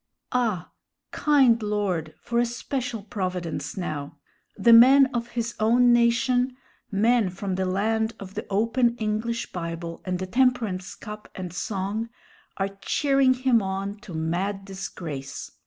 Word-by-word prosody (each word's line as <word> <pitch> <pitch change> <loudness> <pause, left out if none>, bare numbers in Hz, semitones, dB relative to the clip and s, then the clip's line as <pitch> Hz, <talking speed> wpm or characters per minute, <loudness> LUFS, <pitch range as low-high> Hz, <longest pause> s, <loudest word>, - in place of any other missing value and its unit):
Ah! 225 -8 0 0.4
kind 265 -6 +4
Lord, 195 -7 -1
for 235 0 -1
a 240 - +3
special 240 -2 -4
providence 185 -5 -4
now! 150 -6 -4 0.4
The 230 +3 +6
men 265 +4 +9
of 235 -1 -2
his 235 0 -1
own 240 +3 +5
nation 245 +2 +2 0.3
men 220 +1 +3
from 190 +1 -4
the 185 0 -1
land 220 +4 0
of 195 -1 -9
the - - -5
open 230 +4 +2
English 220 +2 -2
Bible 170 -1 -5
and 185 -1 -2 0.2
temperance 235 -8 +1
cup 210 0 -9
and 180 -2 -6
song 200 +4 -3 0.5
are 195 0 0
cheering 275 -3 +3
him 250 -3 +3
on 195 +1 -3
to 195 -7 -10
mad 185 +5 -2
disgrace. 170 -8 -6
210 Hz, 135 wpm, -25 LUFS, 185-240 Hz, 0.5 s, men